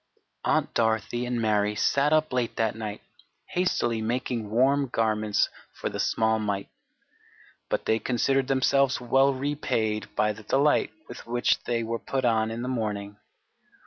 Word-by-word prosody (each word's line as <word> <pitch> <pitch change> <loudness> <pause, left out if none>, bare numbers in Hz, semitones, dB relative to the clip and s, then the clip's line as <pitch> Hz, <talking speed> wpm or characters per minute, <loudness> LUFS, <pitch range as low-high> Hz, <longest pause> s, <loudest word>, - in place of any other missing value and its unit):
Aunt - - +1
Dorothy 115 +2 0
and 120 -1 -1
Mary 105 -2 +1
sat 140 +7 +2
up 155 -2 +2
late 125 -2 -1
that 110 -2 +1
night 110 -2 -5 0.5
hastily 120 -11 0
making 115 -1 -2
warm 135 +5 +3
garments 110 -3 +1 0.2
for - - -4
the - - -6
small 110 0 +1
mite; 100 -2 -2 1.0
but - - -1
they 110 - +2
considered 130 +2 +1
themselves 135 0 +2
well 135 +3 +3
repaid 130 -6 -1
by 105 0 +2
the 110 - -12
delight 140 +7 +2 0.2
with 120 - -10
which 120 +1 +1
they 115 -1 0
were 115 +1 -3
put 130 +2 -2
on 110 -2 +2
in 115 +2 -4
the - - -3
morning. 105 -5 -3
115 Hz, 150 wpm, -26 LUFS, 110-130 Hz, 1.0 s, warm